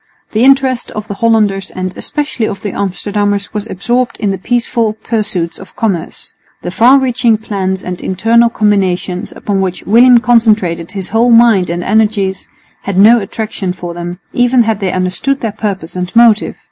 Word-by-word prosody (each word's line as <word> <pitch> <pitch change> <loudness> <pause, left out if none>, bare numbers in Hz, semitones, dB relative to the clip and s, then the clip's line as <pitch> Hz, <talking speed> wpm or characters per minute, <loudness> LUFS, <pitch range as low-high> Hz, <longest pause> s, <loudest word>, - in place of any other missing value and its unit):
The 220 +2 +1
interest 265 -2 +3
of 215 -1 -7
the - - -4
Hollanders 205 -3 +1
and 185 0 -5
especially 290 -7 -3
of 200 - -6
the 205 - -3
Amsterdammers 200 +2 -2
was 210 0 -4
absorbed 240 +6 -1
in 205 -3 0
the 195 - -4
peaceful 235 0 -1
pursuits 210 -7 -3
of 190 - -14
commerce. 195 -7 -3 0.3
The 175 - -4
far 245 +8 +5
reaching 250 -4 +1
plans 190 -3 -3
and 180 -1 -6
international 225 +5 +2
combinations, 190 -4 -1
upon 200 -2 -2
which 185 -1 -3
William 240 +4 +6
concentrated 215 -8 +1
his 195 -2 -5
whole 230 +2 +2
mind 230 -6 +4
and 175 +1 -3
energies, 205 -3 0 0.3
had 200 -2 -4
no 225 +5 +6
attraction 200 -2 -4
for 175 -1 -7
them, 175 +1 -6
even 245 0 +3
had 220 -2 -1
they 190 -3 -1
understood 185 +10 -1
their 225 - -2
purpose 200 -6 -5
and 180 0 -4
motive. 230 -2 +4
210 Hz, 170 wpm, -13 LUFS, 190-230 Hz, 0.3 s, William